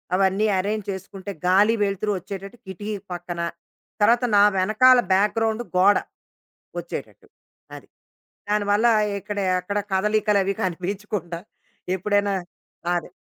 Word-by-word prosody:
అవన్నీ 195 +2 +2
ఎరేంజ్ 210 +2 -2
చేసుకుంటే 195 +1 -7 0.2
గాలి, 205 +5 +5
వెలుతురు 200 +1 -1
వచ్చేటట్టు 195 +4 -8
కిటికీ 205 +3 -5 0.2
పక్కన. 175 -1 -5 0.6
తర్వాత, 235 +4 +4
నా 200 - +7
వెనకాల 220 +7 +5
బ్యాక్ 200 +3 +2
గ్రౌండ్ 225 +1 0
గోడ 200 +3 +6 0.8
వచ్చేటట్టు. - - -8 0.5
అది. - - -13 0.6
దానివల్ల 210 +2 +2 0.3
ఇక్కడయి 200 -2 -2
అక్కడ 200 +3 -3 0.2
కదలికలు 210 +1 +2
అవి 195 - 0
కనిపించకుండా 185 -1 -3 0.6
ఎప్పుడైనా 205 +1 +1 0.6
అదే. 175 0 -4
200 Hz, 110 wpm, -23 LUFS, 190-210 Hz, 0.8 s, నా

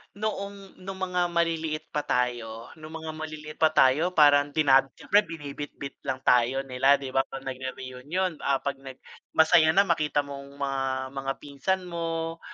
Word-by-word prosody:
noong, 200 -2 -5
nung 190 +1 -7
mga 180 -1 0
maliliit 165 -2 -1
pa 150 - 0
tayo 120 -4 -2
nung 155 +1 -9
mga 160 -1 -5
maliliit 155 -1 -8
pa 160 - +6
tayo, 155 +8 +4
parang 145 -2 +6
din 150 -3 +3 0.2
siyempre, 205 - +3
binibitbit 145 -3 -7
lang 130 -1 -2
tayo 125 +2 +3
nila, 130 +2 +4
'di 135 -2 -6
ba, 135 - +4
pag 135 0 -8
nagre-reunion? 130 +6 -4
Ah, 140 -1 +2
pag 140 -1 -1
nag 135 -1 -10 0.4
masaya 160 0 +6
na 200 - +7
makita 155 -3 +1
mong 140 0 -9
mga 135 -1 -1 0.3
mga 135 0 -2
pinsan 150 +7 -2
mo, 165 -1 -3
150 Hz, 160 wpm, -27 LUFS, 135-165 Hz, 0.4 s, na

